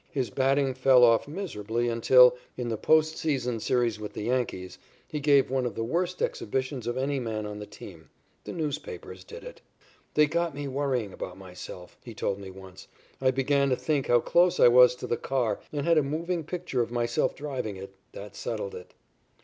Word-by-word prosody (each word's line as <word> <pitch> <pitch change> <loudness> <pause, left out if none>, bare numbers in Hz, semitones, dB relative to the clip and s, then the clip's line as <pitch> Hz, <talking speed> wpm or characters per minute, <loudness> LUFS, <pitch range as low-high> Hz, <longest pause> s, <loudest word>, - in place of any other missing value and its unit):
His 130 -6 -2
batting 135 +1 +1
fell 130 -1 +5
off 115 +1 +5
miserably 120 - -3
until, 125 +2 +6 0.2
in 125 -1 -3
the 115 - -1
post 155 +6 +2
season 125 -7 -1
series 120 -2 0
with 105 -1 -7
the - - -5
Yankees, 115 -6 -2 0.3
he 150 - -4
gave 140 -2 +3
one 130 -1 +1
of 120 -5 -3
the 115 - -2
worst 175 +9 -1
exhibitions 130 +1 -3
of 120 - -2
any 135 +1 -1
man 110 -3 -3
on 105 0 -6
the 105 - -8
team. 90 -5 -12 0.4
The - - -5
newspapers 155 -3 -5
did 475 +2 -11
it. - - -11 0.5
"They 150 - +6
got 170 0 -1
me 145 0 -4
worrying 130 -7 -2
about 90 - -7
myself," 90 -1 -11
he 115 -3 -10
told 100 -1 -2
me 100 -1 -8
once. 95 -1 -12 0.3
"I 130 - +4
began 140 +1 +1
to 130 - +2
think 145 0 -1
how 120 -1 +4
close 175 +5 +3
I - - +8
was 125 0 +7
to - - -7
the 120 - -1
car 120 -6 -1
and 145 -1 -3
had 165 -2 +4
a - - +3
moving 165 +4 -3
picture 170 -7 -2
of 115 - -2
myself 120 0 0
driving 130 -9 -4
it. 95 +1 -9 0.2
That 105 +1 -9
settled 105 -4 -4
it." 90 - -11
125 Hz, 200 wpm, -27 LUFS, 110-145 Hz, 0.5 s, I